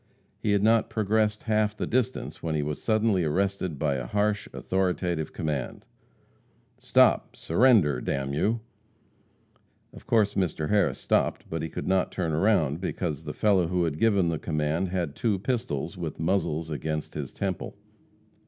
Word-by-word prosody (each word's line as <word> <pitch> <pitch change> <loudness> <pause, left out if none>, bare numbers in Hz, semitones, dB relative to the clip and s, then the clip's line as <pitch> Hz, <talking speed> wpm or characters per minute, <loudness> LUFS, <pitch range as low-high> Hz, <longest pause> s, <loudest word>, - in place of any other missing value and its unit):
He 105 - +1
had 100 0 +2
not 115 +1 +3
progressed 110 0 0
half 110 -1 +1
the - - -2
distance 125 -2 -2
when 80 -2 -2
he 75 - 0
was 75 0 -4
suddenly 110 -4 +2
arrested 95 0 -1
by 70 -2 0
a 60 -2 -5
harsh, 105 - 0
authoritative 90 -4 -1
command: 75 -5 -4 0.9
"Stop! - - +3
Surrender, 85 - +3
d - - -2
n 70 0 -3
you!" 110 +10 0 1.3
Of - - -14
course 105 -3 +3
Mr. 85 -5 -1
Harris 105 -1 +2
stopped, - - 0
but 80 -1 -3
could - - -5
not 95 -1 +1
turn 85 -4 -2
round, 80 -4 +2
because 80 -5 -3
the 75 - -4
fellow 100 -5 +2
who 90 0 0
had 80 -2 -2
given 100 -6 +3
the 80 -2 -2
command 75 +3 -1
had 85 -5 -2
two 110 -4 0
pistols, 95 - -3
with 80 -3 -5
muzzles 80 -2 0
against 75 0 -3
his 70 -4 -5
temple. 95 -3 -4
90 Hz, 155 wpm, -27 LUFS, 75-105 Hz, 1.3 s, not